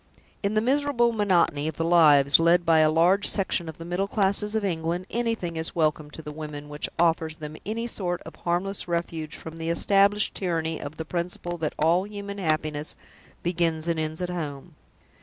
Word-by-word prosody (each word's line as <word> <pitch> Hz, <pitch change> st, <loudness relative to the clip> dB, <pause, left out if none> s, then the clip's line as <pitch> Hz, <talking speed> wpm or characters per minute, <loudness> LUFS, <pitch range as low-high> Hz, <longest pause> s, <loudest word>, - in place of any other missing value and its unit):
In 200 Hz, +1 st, -1 dB
the 215 Hz, -, +3 dB
miserable 260 Hz, -1 st, +2 dB
monotony 180 Hz, -8 st, +2 dB
of 160 Hz, -, -4 dB
the 165 Hz, -, -1 dB
lives 150 Hz, -5 st, +6 dB
led 170 Hz, +1 st, +4 dB
by 165 Hz, -1 st, +5 dB
a 155 Hz, 0 st, +5 dB
large 175 Hz, +6 st, +4 dB
section 185 Hz, -4 st, 0 dB
of 160 Hz, -, -9 dB
the 165 Hz, -, -8 dB
middle 180 Hz, +3 st, -1 dB
classes 205 Hz, +1 st, +1 dB
of 215 Hz, -2 st, 0 dB
England, 170 Hz, 0 st, -2 dB
anything 225 Hz, -8 st, -2 dB
is 160 Hz, 0 st, -3 dB
welcome 155 Hz, -2 st, 0 dB
to 160 Hz, +2 st, -10 dB
the 150 Hz, -, -6 dB
women 150 Hz, -1 st, -7 dB
which 150 Hz, 0 st, -4 dB
offers 165 Hz, -1 st, +2 dB
them 155 Hz, -1 st, -8 dB
any 225 Hz, +2 st, -2 dB
sort 180 Hz, -6 st, -2 dB
of -, -, -11 dB
harmless 180 Hz, +3 st, -2 dB
refuge 170 Hz, -2 st, -3 dB
from 160 Hz, 0 st, -9 dB
the 165 Hz, 0 st, -3 dB
established 200 Hz, +4 st, +3 dB
tyranny 165 Hz, -4 st, -2 dB
of 145 Hz, +2 st, -7 dB
the 160 Hz, -, -5 dB
principle 175 Hz, 0 st, -4 dB
that 155 Hz, -1 st, -2 dB
all 170 Hz, +5 st, +2 dB
human 200 Hz, -1 st, -7 dB
happiness 155 Hz, -3 st, -1 dB, 0.5 s
begins 170 Hz, -2 st, 0 dB
and 165 Hz, -1 st, 0 dB
ends 155 Hz, +2 st, -3 dB
at 180 Hz, -, -3 dB
home. 155 Hz, -1 st, -5 dB
170 Hz, 190 wpm, -26 LUFS, 160-195 Hz, 0.5 s, lives